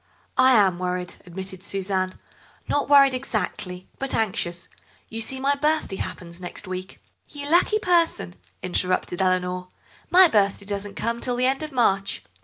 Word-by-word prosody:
"I 260 0 +7
am 195 -6 +4
worried," 180 0 -3
admitted 190 +1 -7
Suzanne; 190 -1 -2 0.5
"not 290 - 0
worried 275 -2 +7
exactly, 205 -7 -3
but 270 0 0
anxious. 175 -5 -1 0.4
You 225 0 -4
see, 260 +4 -1
my 275 +2 +2
birthday 300 -8 0
happens 175 0 -7
next 180 +2 -5
week—" 185 0 -6 0.3
"You 285 -1 -7
lucky 350 +7 +4
person," 340 - +1 0.3
interrupted 180 0 0
Eleanor; 180 -1 0 0.4
"my 370 +1 +8
birthday 200 -6 +1
doesn't 200 0 -4
come 235 +1 -2
till 250 -1 -1
the 250 +1 +1
end 265 +2 +1
of 310 -1 -5
March." 195 -6 +1
200 Hz, 150 wpm, -24 LUFS, 185-270 Hz, 0.5 s, my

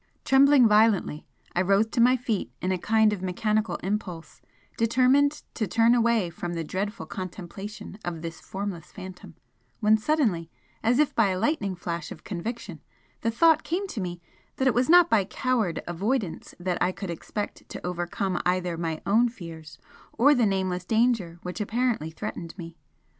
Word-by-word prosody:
Trembling 270 -2 +6
violently, 210 -7 +3 0.3
I 175 - +3
rose 195 +3 +3
to 235 - +1
my 250 +2 +5
feet 230 -5 -2
in 185 - -1
a 185 - 0
kind 220 +2 +3
of 195 - -5
mechanical 210 0 0
impulse, 185 -4 -4 0.3
determined 255 +5 +3
to 215 - -2
turn 230 +5 +4
away 230 -6 +2
from 175 +1 -5
the 165 - -2
dreadful 190 +2 -4
contemplation 195 +4 -7
of 170 -2 -5
this 165 -1 -6
formless 190 -4 -6
Phantom, 185 -4 -10 0.4
when 215 +1 +4
suddenly, 215 - +1 0.3
as 235 +2 +2
if 300 0 +2
by 225 -3 +3
a 185 - -1
lightning 200 - 0
flash 170 -2 -5
of - - -10
conviction, 220 +5 -6 0.4
the 230 - +1
thought 315 +7 +4
came 360 +6 -2
to 220 - -4
me 175 -1 -4 0.4
that 265 - +1
it 255 - +4
was 250 +4 +1
not 350 0 +8
by 220 - +3
coward 225 -3 -1
avoidance 195 +2 -2
that 175 0 -2
I 180 - +3
could 190 -1 -6
expect 205 +5 -6
to - - -7
overcome 180 +1 -2
either 180 -2 0
my 160 -2 -3
own 230 +5 +4
fears 165 - -10 0.4
or 285 +5 +5
the 245 -5 +3
nameless 185 -2 -1
danger 220 -5 +1
which 180 +4 -5
apparently 225 -6 0
threatened 170 -1 -6
me. 165 -2 -8
200 Hz, 170 wpm, -26 LUFS, 175-235 Hz, 0.4 s, not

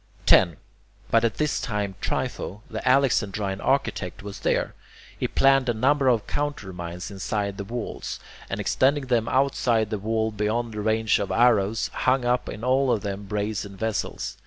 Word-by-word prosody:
10. 85 -5 +5 0.5
But 115 0 +4
at 115 - +1
this 150 -1 0
time 105 -3 -2
Trypho, 105 +4 -3
the - - -4
Alexandrine 105 -7 +1
architect, 100 - -1
was 100 0 -7
there. - - 0 0.4
He - - -1
planned 135 -1 +3
a 120 - +1
number 135 +4 +2
of 120 -4 +3
countermines 90 -11 -4
inside 100 0 -3
the 100 - -4
wall, 115 +3 -5 0.5
and - - -3
extending 140 +1 +2
them 120 -3 +1
outside 125 -5 +1
the 105 - -1
wall 110 +1 0
beyond 110 +2 -1
the 105 - -4
range 110 +1 +2
of 100 - -2
arrows, 115 -2 +3
hung 130 -1 +1
up 125 +1 +1
in 110 - -7
all 130 +1 +3
of 110 -4 +1
them 100 0 -4
brazen 105 -1 -3
vessels. 110 +1 -3
110 Hz, 160 wpm, -25 LUFS, 100-125 Hz, 0.5 s, 10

